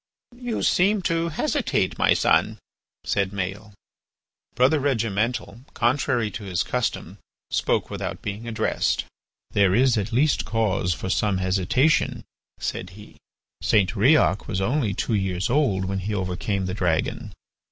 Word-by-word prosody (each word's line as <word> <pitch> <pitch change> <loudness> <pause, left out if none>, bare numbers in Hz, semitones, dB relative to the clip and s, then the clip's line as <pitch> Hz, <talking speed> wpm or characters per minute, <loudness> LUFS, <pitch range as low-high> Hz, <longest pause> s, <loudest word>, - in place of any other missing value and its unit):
"You 245 -3 -3
seem 195 +2 +3
to 165 -1 0
hesitate, 150 - -1
my - - +4
son," - - +2 0.5
said 100 -2 0
Maël. 100 +2 -5 0.8
Brother 130 +5 +4
Regimental, 115 -3 -1
contrary 120 -2 +1
to 105 - -7
his 95 -1 -1
custom, 125 -2 -3 0.3
spoke - - 0
without - - -5
being 105 +3 -5
addressed. 110 -1 0 0.5
"There 100 -2 +3
is 125 -1 +3
at 100 +1 -4
least 140 +6 +2
cause 95 -6 0
for 95 - -4
some 105 -3 +1
hesitation," 95 - +1 0.4
said 90 - -4
he. 105 - -14 0.4
"St. 100 -4 +3
Riok 115 -2 +3
was 95 -4 -2
only 115 0 0
two 115 - -2
years 95 -1 -1
old 110 -10 +2
when 95 +1 -2
he 105 +3 -3
overcame 95 +1 -2
the 90 - -3
dragon. 85 -5 -1
105 Hz, 135 wpm, -24 LUFS, 95-125 Hz, 0.8 s, my